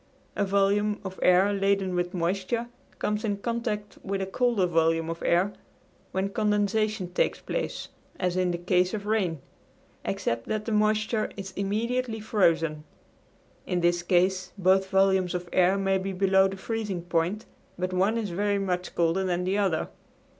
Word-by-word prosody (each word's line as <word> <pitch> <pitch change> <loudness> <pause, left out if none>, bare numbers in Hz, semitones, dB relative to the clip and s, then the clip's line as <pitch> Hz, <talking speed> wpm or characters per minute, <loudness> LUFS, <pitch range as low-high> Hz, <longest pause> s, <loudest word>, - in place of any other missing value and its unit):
A 205 - +1
volume 200 +1 +2
of 190 0 -6
air 185 +3 +5
laden 195 -1 +1
with 175 0 -1
moisture 190 +7 -1 0.3
comes 210 +1 -1
in 205 -3 -1
contact 210 -2 -3
with 195 0 -3
a 190 - -1
colder 225 0 +1
volume 165 -1 +1
of 165 - -7
air, 185 +4 +2 0.6
when 190 +1 -1
condensation 210 -2 0
takes - - +1
place, - - -4 0.3
as 180 -1 0
in 185 -1 +1
the 175 - -1
case 180 +2 +1
of 205 -1 -6
rain, 195 -7 0 0.6
except 115 0 -2
that 215 -1 -2
the 230 - -3
moisture 215 +1 +1
is 195 -1 -6
immediately 220 +4 -1
frozen. 165 -8 +1 0.8
In 180 -1 0
this 175 0 +2
case 180 +1 +1
both 190 0 +3
volumes 190 -2 +3
of 180 0 -4
air 185 +1 +4
may 195 -1 +1
be 195 +1 -3
below 190 0 +4
the 195 0 -6
freezing 205 -4 -3
point, 175 +5 -1 0.3
but 185 +1 -2
one 195 +5 +2
is 215 -5 -2
very 200 +3 0
much 180 -2 -2
colder 170 +3 +2
than 180 -1 0
the 190 +3 0
other. 190 -6 +1
190 Hz, 160 wpm, -27 LUFS, 180-210 Hz, 0.8 s, air